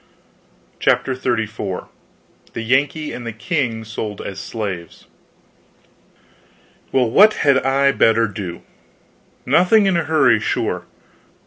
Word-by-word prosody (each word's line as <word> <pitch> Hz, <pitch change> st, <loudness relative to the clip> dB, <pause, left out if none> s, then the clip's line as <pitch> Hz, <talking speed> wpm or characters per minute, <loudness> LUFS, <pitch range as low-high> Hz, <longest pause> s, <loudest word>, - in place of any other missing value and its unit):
CHAPTER 130 Hz, -, +1 dB
XXXIV 115 Hz, -6 st, -3 dB, 0.7 s
THE -, -, -4 dB
YANKEE 140 Hz, +5 st, 0 dB
AND 125 Hz, -, -7 dB
THE -, -, -3 dB
KING 120 Hz, -, -2 dB
SOLD 110 Hz, -2 st, -6 dB
AS 95 Hz, -1 st, -6 dB
SLAVES 95 Hz, -7 st, -6 dB, 1.9 s
Well, 130 Hz, -2 st, +2 dB
what 210 Hz, -, +6 dB
had 140 Hz, -2 st, +5 dB
I 135 Hz, +1 st, +3 dB
better 115 Hz, -3 st, +3 dB
do? 95 Hz, -4 st, -7 dB, 0.8 s
Nothing 200 Hz, +4 st, +4 dB
in 190 Hz, -2 st, +2 dB
a 170 Hz, -, 0 dB
hurry, 135 Hz, -8 st, +3 dB
sure. -, -, -2 dB
120 Hz, 110 wpm, -19 LUFS, 110-140 Hz, 1.9 s, what